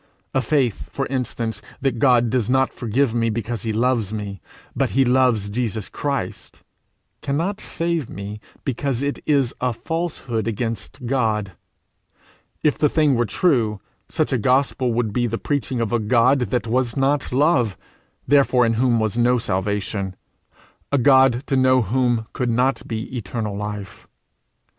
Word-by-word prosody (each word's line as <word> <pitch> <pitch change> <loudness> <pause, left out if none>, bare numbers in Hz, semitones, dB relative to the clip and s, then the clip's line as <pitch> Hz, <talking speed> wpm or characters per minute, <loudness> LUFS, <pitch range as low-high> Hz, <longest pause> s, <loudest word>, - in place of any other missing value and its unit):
A 135 - +2
faith, 130 -6 0
for 135 - -2
instance, 115 -4 -2 0.2
that 130 -4 -1
God 120 -3 +4
does 125 -3 0
not 130 +1 +2
forgive 120 +1 0
me 115 -1 +1
because 115 0 -3
he 110 - -2
loves 115 -2 +1
me, 100 -4 -5 0.3
but - - +1
because - - -8
he 135 0 +4
loves 125 -5 +2
Jesus 110 -4 -2
Christ, 140 -10 -4 0.6
cannot 170 +9 -1
save 165 -5 -2
me, 100 +2 -7 0.3
because 135 0 -1
it 140 0 -2
is 140 -5 +2
a 125 0 +1
falsehood 135 - -3
against 115 +3 -4
God: 110 -6 0 1.1
if 150 - +2
the 150 -1 +4
thing 150 -2 +3
were 120 -2 +1
true, 115 - +1 0.3
such - - 0
a 130 - +1
gospel 130 +1 +2
would 115 -2 -1
be 120 +1 +1
the 115 0 -2
preaching 135 -3 -2
of 115 0 -1
a 120 - +3
God 120 +5 +3
that 125 -3 0
was 120 +1 0
not 140 +1 +1
love, 125 - +2 0.5
therefore 130 -3 +4
in 115 - +2
whom 120 -3 +3
was 110 +1 -1
no 125 +1 +4
salvation, 100 -2 -2 0.8
a 140 - +3
God 130 -1 +5
to 135 - 0
know 130 -1 +4
whom 120 0 +1
could 125 -1 -1
not 125 +3 +1
be 110 +2 -5
eternal 110 -2 -3
life. 105 -1 -6
120 Hz, 155 wpm, -22 LUFS, 110-135 Hz, 1.1 s, God